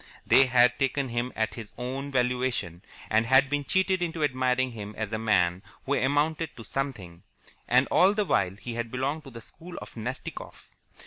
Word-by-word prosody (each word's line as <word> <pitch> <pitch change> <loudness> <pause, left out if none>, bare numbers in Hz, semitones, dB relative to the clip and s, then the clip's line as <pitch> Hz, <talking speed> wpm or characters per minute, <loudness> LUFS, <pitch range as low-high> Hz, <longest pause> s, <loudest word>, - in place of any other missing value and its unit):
They 135 0 +6
had 125 0 +4
taken 135 0 0
him 120 +1 -2
at 110 0 -1
his 110 -3 -9
own 130 +3 -4
valuation, 125 -9 -1 0.3
and 110 +1 +3
had 135 +2 +5
been 145 0 0
cheated 190 +3 +1
into 165 -2 -2
admiring 130 -2 +1
him 105 -2 -8
as 110 0 -4
a 110 - -1
man 90 -5 +2 0.2
who 140 - 0
amounted 145 +4 0
to 115 - -8
something, 105 -10 -4 0.5
and 125 +3 +4
all 195 +3 +5
the 210 -1 +1
while 95 - +1
he 115 +3 -7
had 115 0 -3
belonged 140 +5 -2
to - - -9
the 115 -2 -10
school 175 +9 -11
of - - -9
Nastikoff. 120 +3 -7
125 Hz, 185 wpm, -27 LUFS, 115-140 Hz, 0.5 s, They